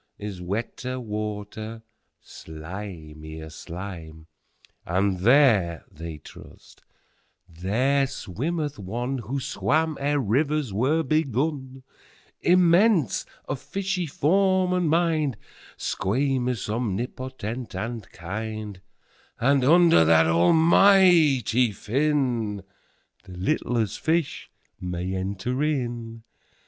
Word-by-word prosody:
18Is 100 -3 -6
wetter 120 +7 -4
water, 110 0 -5 0.4
slimier 80 -2 -9
slime!19And 85 +2 -5
there 105 - +4
(they 80 0 -7
trust) - - -15 0.7
there 120 +11 +1
swimmeth 145 - -4
One20Who 120 +5 -3
swam 155 +3 0
ere 145 +1 +1
rivers 140 +1 0
were 140 +10 +1
begun,21Immense, 155 - +1 0.2
of 135 - -3
fishy 185 +4 -2
form 185 +5 +2
and 180 -3 +1
mind,22Squamous, 135 - -1
omnipotent, 120 +2 -4
and 115 -2 -5
kind;23And 105 +2 -6 0.9
under 170 - +6
that 80 0 +5
Almighty 150 - +5
Fin,24The 120 -3 -1 0.6
littlest 105 +3 -1
fish 160 -2 -1 0.3
may 90 +1 -4
enter 100 +7 -3
in. 120 -6 -2
120 Hz, 75 wpm, -25 LUFS, 95-150 Hz, 0.9 s, under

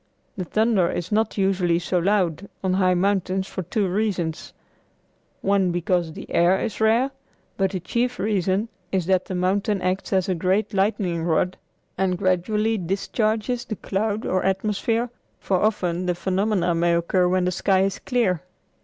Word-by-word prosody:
The 185 - -4
thunder 215 -2 +2
is 175 +2 -4
not 220 +1 +1
usually 190 -3 +2
so 175 +1 0
loud 190 -1 0
on 185 -1 +1
high 185 -1 +3
mountains 190 0 +1
for 190 - -5
two 190 +3 -1
reasons 180 -5 -2 0.9
one 195 -2 +2
because 175 -1 0
the - - -9
air 175 +3 +4
is 220 - -4
rare, 230 +5 +3 0.4
but 195 -1 +1
the 185 -1 -3
chief 240 +7 -1
reason 195 +1 0 0.2
is 185 -3 0
that 185 0 +2
the 185 - -4
mountain 195 +3 +1
acts 185 +1 -2
as 190 -2 +2
a 190 - +1
great 185 +5 0
lightning 195 -4 0
rod 175 +2 +1 0.4
and 185 -1 +1
gradually 210 +4 +1
discharges 215 +6 -1
the 215 - -5
cloud 210 +2 -2
or 185 - 0
atmosphere, 215 +5 0 0.3
for 190 - 0
often 180 -4 0
the 180 - +1
phenomena 190 0 0
may 170 +1 +2
occur 180 +2 +2
when 180 0 +1
the 180 - +1
sky 190 +1 +2
is 195 0 0
clear. 220 - 0
190 Hz, 165 wpm, -23 LUFS, 180-210 Hz, 0.9 s, air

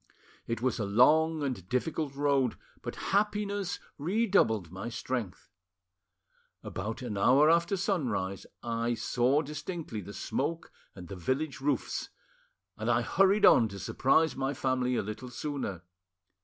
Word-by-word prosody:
It 115 0 -3
was 130 -1 0
a - - 0
long 155 +9 +4
and 125 -10 -4
difficult 140 +2 -1
road, 140 -3 +1 0.2
but - - -5 0.2
happiness 205 -2 0 0.2
redoubled 165 - +2
my 95 +5 -5
strength. 120 -5 -4 1.1
About 110 +4 -5
an 105 -5 -3
hour 140 +9 +6
after 170 +4 +2
sunrise 135 - -1 0.2
I 115 0 -1
saw 125 +6 +1
distinctly 150 - -5
the 100 +1 -9
smoke 160 +10 -3 0.2
and 90 -3 -10
the 95 - -7
village 135 - -2
roofs, 145 +1 -1 0.7
and - - -2
I - - +3
hurried 195 +2 +4
on 115 - +7
to 100 -2 -8
surprise 140 - +2
my 135 +1 -2
family 130 -1 0
a - - 0
little 110 +5 -6
sooner. 125 - -4
130 Hz, 135 wpm, -30 LUFS, 115-160 Hz, 1.1 s, on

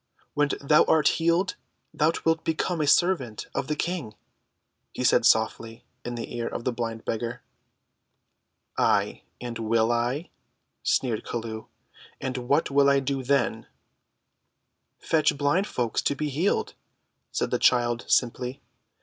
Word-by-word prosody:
"When 145 0 +2
thou 150 +2 +5
art 155 -2 +4
healed, 170 +4 +1 0.4
thou 155 +2 +3
wilt 165 0 +2
become 165 +1 -1
a 150 - 0
servant 140 - +2
of 135 - -2
the 150 - -1
King," 150 -10 -3 0.8
he - - -3
said - - +4
softly 115 +1 +1 0.2
in 120 0 -5
the 120 0 -6
ear 120 -1 -2
of - - -5
the 125 - 0
blind 115 -2 -4
beggar. 120 +2 -3 1.4
"Ay, - - +2 0.2
and 120 -1 -6
will 115 +1 +2
I?" 120 +7 -1 0.5
sneered 120 -5 0
Chelluh; 110 -1 -5 0.5
"and 130 -1 -3
what 145 0 +2
will 140 0 +5
I 140 0 +4
do 135 0 -2
then?" 125 -4 0 1.3
"Fetch 155 -3 +1
blind 150 +8 +1
folks 120 -3 -1
to 140 - 0
be 150 +1 -2
healed," 160 +8 0 0.6
said - - -2
the - - +1
child 120 -1 +2
simply. 125 +2 0
130 Hz, 140 wpm, -26 LUFS, 115-150 Hz, 1.4 s, thou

